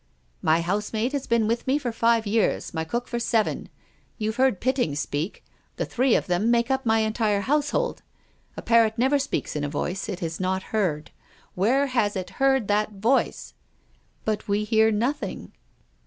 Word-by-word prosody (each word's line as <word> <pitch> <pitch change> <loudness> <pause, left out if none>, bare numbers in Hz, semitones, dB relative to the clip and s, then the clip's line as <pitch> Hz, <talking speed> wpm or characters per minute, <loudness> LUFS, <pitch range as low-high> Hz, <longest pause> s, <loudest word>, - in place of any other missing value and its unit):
" - - -40
My 165 +1 +4
housemaid 210 +6 -1
has 280 -2 -3
been 230 -2 +2
with 235 +3 -1
me 265 +2 +3
for 255 -5 -3
five 230 0 +2
years, 215 +1 0
my 160 -1 -1
cook 240 +9 -3
for 240 - -3
seven. 230 -2 0 0.5
You've 220 0 -2
heard 260 -7 +3
Pitting 255 - 0
speak. 145 +4 -3 0.3
The - - -2
three 255 0 +2
of - - +1
them 180 +5 +1
make 235 +2 +2
up 265 -2 0
my 225 0 +4
entire 215 -2 +1
household. 295 - 0 0.6
A - - -6
parrot 230 -1 +3
never 265 +4 +3
speaks 275 - -3
in 150 - -2
a 145 - -1
voice 175 +8 -3
it 190 -3 -4
has 165 -1 -4
not 190 0 -1
heard. 170 -9 -1 0.4
Where 245 +10 +2
has 235 -6 0
it 185 -1 -4
heard 265 -5 +3
that 210 +1 +1
voice? 225 +7 0 0.2
" - - -38
" - - -39
But 215 -1 -2
we 205 +1 +1
hear 220 +1 +3
nothing? 240 +7 -2
220 Hz, 185 wpm, -25 LUFS, 195-245 Hz, 0.6 s, My